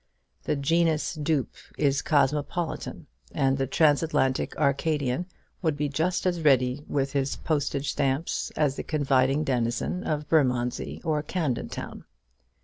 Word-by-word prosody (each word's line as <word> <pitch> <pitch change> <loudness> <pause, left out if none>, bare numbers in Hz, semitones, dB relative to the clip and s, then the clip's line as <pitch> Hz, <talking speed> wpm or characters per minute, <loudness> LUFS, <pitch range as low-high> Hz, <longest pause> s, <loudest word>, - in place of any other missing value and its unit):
The - - +1
genus 160 +2 +1
dupe 150 -3 -1 0.2
is 140 -2 +2
cosmopolitan, 150 +3 0 0.3
and 135 0 +1
the 135 - 0
Transatlantic 145 -2 +2
Arcadian 145 +2 0 0.3
would 160 -5 0
be 150 0 -1
just 165 +7 0
as 175 -2 0
ready 130 -2 +3
with 135 -1 -1
his 140 -1 0
postage 145 -2 -1
stamps 140 +3 -1
as 145 -3 +1
the - - -3
confiding 140 -1 +2
denizen 125 +7 -1
of 150 -1 -2
Bermondsey 125 -6 0
or 155 -3 0
Camden 150 -5 -2
Town. - - -7
145 Hz, 130 wpm, -27 LUFS, 135-155 Hz, 0.3 s, ready